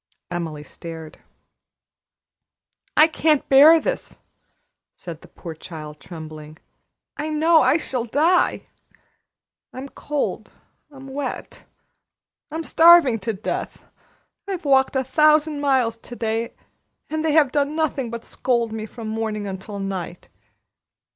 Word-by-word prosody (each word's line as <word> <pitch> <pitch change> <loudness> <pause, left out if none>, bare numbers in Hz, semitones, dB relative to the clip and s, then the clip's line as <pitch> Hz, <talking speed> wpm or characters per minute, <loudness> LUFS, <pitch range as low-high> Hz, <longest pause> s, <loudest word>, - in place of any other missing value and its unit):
Emily 165 -4 -4
stared. 160 0 -10 1.8
"I 310 - +8
can't 315 -2 +1
bear 300 +5 +8
this!" - - -4 0.8
said 165 -3 -9
the - - -15
poor 165 - -9
child, 155 -2 -10
trembling. 155 -2 -10 0.6
"I 300 +2 -3
know 315 +1 +4
I 300 - +4
shall 255 -7 -3
die. 315 +9 +2 1.1
I'm 265 +2 -8
cold, 290 +1 -3 0.4
I'm 270 -2 -13
wet, 270 -1 -6 0.8
I'm 320 +2 -4
starving 325 -9 +6
to 220 +3 -3
death. 200 +2 -5 0.6
I've 370 -4 -4
walked 270 -1 +3
a 265 - +1
thousand 305 +2 +3
miles 260 -5 +1
to 240 +1 -11
day, 225 0 -2 0.5
and 315 0 -3
they 315 -2 +1
have 295 -4 +4
done 290 +1 0
nothing 290 -6 -1
but 235 0 -7
scold 235 -3 -1
me 220 0 -5
from 225 0 -8
morning 220 -1 -3
until 195 +1 -6
night. 190 -3 -5
255 Hz, 120 wpm, -22 LUFS, 200-300 Hz, 1.8 s, I